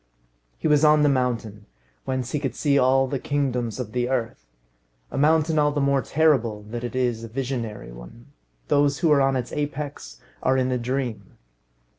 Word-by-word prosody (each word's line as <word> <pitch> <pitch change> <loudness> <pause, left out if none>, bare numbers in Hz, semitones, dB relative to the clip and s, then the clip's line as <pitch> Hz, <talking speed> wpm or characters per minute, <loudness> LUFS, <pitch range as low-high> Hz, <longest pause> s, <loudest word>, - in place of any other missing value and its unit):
He - - -1
was 150 0 +4
on 150 -1 +5
the 145 - +4
mountain, 115 -6 -2 0.4
whence 130 -1 -3
he 150 - -1
could 135 -3 -3
see 145 -2 +1
all 135 +1 +4
the 135 0 -3
kingdoms 125 -6 -2
of 115 -4 -5
the 125 +1 -1
earth. 120 -3 -3 0.6
A - - -5
mountain 155 +1 +3
all 150 0 +3
the 145 - -2
more 140 -1 +2
terrible 130 -10 +1
that 120 0 -5
it 120 0 -5
is 120 -3 0
a - - -6
visionary 120 - -4
one. - - -13 0.4
Those 145 0 +2
who 165 - +2
are 145 -2 +5
on 135 0 +2
its 125 -2 -3
apex 145 - -5 0.2
are 130 0 +2
in 130 0 +1
a 125 - 0
dream. 125 -1 -4
130 Hz, 185 wpm, -24 LUFS, 120-145 Hz, 0.6 s, on